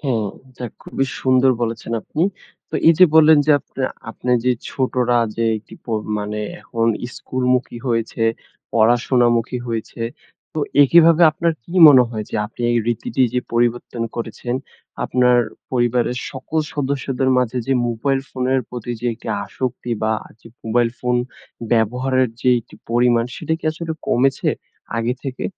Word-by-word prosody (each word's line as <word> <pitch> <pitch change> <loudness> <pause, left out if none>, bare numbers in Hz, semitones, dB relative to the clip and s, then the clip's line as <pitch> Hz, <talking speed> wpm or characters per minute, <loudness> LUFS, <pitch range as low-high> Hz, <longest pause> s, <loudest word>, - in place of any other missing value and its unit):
হ্যাঁ, 120 -7 -1 0.2
এটা 125 -1 -7 0.2
খুবি 135 - -2 0.2
সুন্দর 130 0 +4
বলেছেন 115 0 -3
আপনি। 155 - -3 0.5
তো - - -7
এই 165 - +8
যে, 185 - +9
বললেন, 160 -1 +7
যে, - - +4
আপনা 130 - -5 0.3
আপনার 125 0 0
যে, 125 - +4 0.2
ছোটরা 125 -2 +1 0.2
যে, 115 - 0
একটি 105 - -15
প - - -37 0.3
মানে 105 +1 -4 0.2
এখন 115 0 -2 0.3
স্কুলমুখী 125 -1 -1
হয়েছে, 115 -1 -1 0.5
পড়াশোনামুখী 120 +1 +2
হয়েছে। 115 0 -4 0.5
তো 155 - -4 0.2
একিভাবে 165 +3 +6
আপনার 165 +2 0
কি 170 - -12 0.2
মনে 130 -4 +8
হয়. 110 -2 -4
যে, - - -7
আপনি 115 - -15
এই 120 - +2
রীতিটি 120 +2 0
যে, 125 - +2
পরিবর্তন 120 0 0
করেছেন, 115 +1 -4 0.5
আপনার 125 -1 +3 0.3
পরিবারের 125 0 +1
সকল 135 +4 -4 0.2
সদস্যদের 135 -2 -1
মাঝে 125 0 0
যে, 135 - +1 0.2
মোবাইল 135 +4 0
ফোনের 130 0 0
প্রতি 120 -1 -6
যে, 120 - -2
একটি 115 - -10 0.2
আসক্তি, 125 -1 -4
বা 110 0 +2 0.3
যে, - - -16 0.2
মোবাইল 115 +1 +2
ফোন 125 0 0 0.6
ব্যবহারের 125 +3 +2
যে, 125 - +3
একটি 110 - -18 0.2
পরিমাণ, 120 0 +3
সেটা 160 0 -2
কি - - -14
আসলে 160 0 -5
কমেছে 135 +2 +2 0.5
আগে 115 +2 0
থেকে? 130 -1 -5
125 Hz, 150 wpm, -20 LUFS, 115-130 Hz, 0.6 s, যে